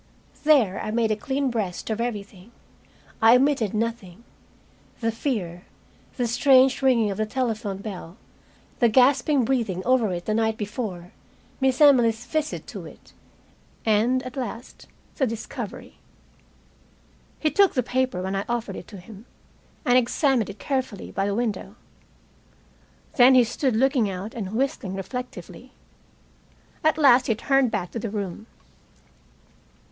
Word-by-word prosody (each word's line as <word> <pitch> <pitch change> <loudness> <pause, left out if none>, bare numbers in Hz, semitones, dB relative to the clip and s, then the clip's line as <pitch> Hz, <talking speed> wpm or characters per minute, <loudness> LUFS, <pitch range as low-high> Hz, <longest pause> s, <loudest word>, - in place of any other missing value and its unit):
There 250 -11 +4
I - - -4
made 225 0 +1
a - - +2
clean 270 +2 -2
breast 215 -3 -3
of 220 +1 -2
everything 205 -3 -6 0.7
I 225 +2 +7
omitted 260 -5 +2
nothing. 225 -3 -4 0.8
The 230 -1 0
fear, 205 - -4 0.5
the 245 - 0
strange 260 +3 +4
ringing 235 -6 +3
of 195 - -5
the 215 - 0
telephone 220 -5 -2
bell; 190 -4 -8 0.6
the 235 - +4
gasping 260 +2 +3
breathing 220 -8 -1
over 245 -5 +2
it 175 -1 -4
the 215 - -1
night 220 0 0
before; 205 -5 -5 0.5
Miss 265 -2 +1
Emily's 240 -6 +5
visit 310 -1 -3
to - - -8
it. - - -16 0.7
And, 230 +4 +2
at 255 - -8
last, 245 -2 -7 0.3
the 265 - +2
discovery. 225 -1 -7 1.4
He 310 - +1
took 400 -2 +3
the 255 - +1
paper 255 -6 -1
when 190 +1 -3
I 195 - -1
offered 235 -5 -3
it 170 - -10
to 205 - -11
him, 205 +5 -13 0.6
and 250 +1 +5
examined 255 -2 +1
it 200 - -8
carefully 260 -8 -3
by 195 - -1
a 200 0 -1
window. 215 -3 -3 1.4
Then 255 +1 +7
he 250 - +7
stood 245 +1 -1
looking 255 -2 +2
out 195 +4 -6
and 210 -2 -5
whistling 230 -7 -2
reflectively. 250 +6 -7 1.1
At 310 0 +3
last 260 -4 +5
he 225 - +2
turned 270 +2 +2
back 195 -5 -3
to 230 - -4
the 225 - -4
room. 205 0 -5
230 Hz, 140 wpm, -24 LUFS, 205-260 Hz, 1.4 s, I